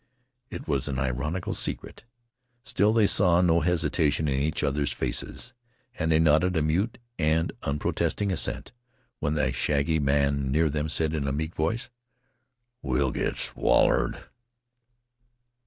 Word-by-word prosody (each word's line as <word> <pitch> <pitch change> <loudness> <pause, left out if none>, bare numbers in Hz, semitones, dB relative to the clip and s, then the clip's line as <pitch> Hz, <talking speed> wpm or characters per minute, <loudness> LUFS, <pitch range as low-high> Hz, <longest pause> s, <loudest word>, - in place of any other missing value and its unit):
It - - -8
was 70 -2 -1
an 70 -2 -3
ironical 70 +7 -2
secret. - - -3 0.6
Still, 105 -2 +2
they 110 -1 +4
saw 90 -3 +4
no 85 -2 +4
hesitation 80 -2 +1
in 70 -1 0
each 75 +2 -1
other's 70 +1 0
faces, 120 - -4 0.4
and 80 -5 -1
they 80 - +5
nodded 80 +3 +3
a 80 - +2
mute 90 +9 0 0.2
and 80 +1 +1
unprotesting 75 +7 -1
assent 90 - -2 0.5
when 75 0 -1
a 65 -3 +1
shaggy 70 +5 +1
man 70 -1 +1
near 80 +1 +2
them 75 +1 -2
said 80 0 -1
in 70 -3 -2
a - - 0
meek 80 +4 -3
voice: 110 +10 -2 0.9
"We'll 65 0 0
git - - -2
swallowed." - - +2
75 Hz, 140 wpm, -26 LUFS, 70-85 Hz, 0.9 s, they